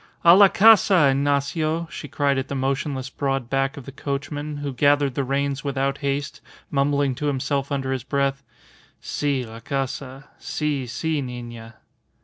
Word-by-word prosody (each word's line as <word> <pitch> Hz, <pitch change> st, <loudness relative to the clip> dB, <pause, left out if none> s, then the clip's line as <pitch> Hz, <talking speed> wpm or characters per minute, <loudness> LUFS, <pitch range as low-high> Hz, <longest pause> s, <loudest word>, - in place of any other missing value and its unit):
"A 170 Hz, 0 st, +8 dB
la 200 Hz, +1 st, +8 dB
casa, 195 Hz, -7 st, +6 dB
Ignacio," 145 Hz, +4 st, 0 dB
she 150 Hz, -, -7 dB
cried 140 Hz, 0 st, +1 dB
at 135 Hz, -, -4 dB
the 140 Hz, -, -4 dB
motionless 135 Hz, 0 st, -2 dB
broad 135 Hz, -4 st, -2 dB
back 135 Hz, +2 st, 0 dB
of 135 Hz, -, -9 dB
the 135 Hz, -, -8 dB
coachman, 145 Hz, +2 st, -4 dB
who 145 Hz, -1 st, -4 dB
gathered 145 Hz, +1 st, +3 dB
the 140 Hz, -, -1 dB
reins 140 Hz, +1 st, -1 dB
without 140 Hz, -1 st, -1 dB
haste, 140 Hz, 0 st, -3 dB, 0.3 s
mumbling 140 Hz, -1 st, +1 dB
to 145 Hz, +4 st, -3 dB
himself 140 Hz, 0 st, -1 dB
under 135 Hz, -1 st, -1 dB
his 130 Hz, -3 st, -2 dB
breath, 140 Hz, 0 st, -1 dB, 0.6 s
"Si, 140 Hz, -4 st, -2 dB
la 115 Hz, 0 st, -10 dB
casa. 135 Hz, +2 st, -4 dB
Si, 145 Hz, -4 st, -2 dB
si 155 Hz, +5 st, -2 dB
nina." 120 Hz, -3 st, -8 dB
140 Hz, 155 wpm, -23 LUFS, 135-145 Hz, 0.6 s, A